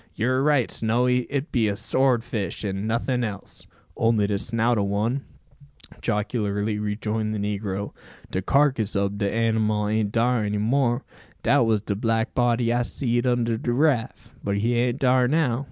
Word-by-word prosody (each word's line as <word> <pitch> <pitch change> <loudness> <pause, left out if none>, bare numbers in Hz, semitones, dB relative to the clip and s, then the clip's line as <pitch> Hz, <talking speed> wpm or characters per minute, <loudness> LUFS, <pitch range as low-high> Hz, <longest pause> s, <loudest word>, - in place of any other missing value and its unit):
"You're 130 +4 +1
right, 145 -4 +2
Snowy, 125 +2 +1
it 140 +1 -3
be 115 -5 +2
a 100 - -1
sword 125 +2 +1
fish, 105 -3 -4
and 100 +1 -3
nothing 120 +2 0
else." 105 -4 -7 0.3
"Only 110 -2 +2
de 100 -1 -1
snout 115 +1 +1
o' - - +1
one," 110 +7 -1 0.8
jocularly 105 0 -1
rejoined 110 +1 -2
the - - -2
negro. 100 -1 -3 0.4
"De 95 - -1
karkiss 130 -2 +2
ob 100 +1 -1
de 100 -1 0
anymal 110 -2 +1
an't 110 -1 0
dar 120 0 +1
any 105 0 -1
more. 120 +3 +1 0.4
Dat 120 - +3
was 110 -2 +2
de 100 -1 -3
black 115 +2 0
body 120 -1 +2
I 120 - +1
seed 120 0 -1
under 120 -2 +1
de 120 - -2
raff; 130 -2 0
but 100 0 -1
he 115 +4 +1
an't 120 +1 +1
dar 130 -2 +3
now. 135 -4 +1
115 Hz, 170 wpm, -24 LUFS, 105-125 Hz, 0.8 s, Dat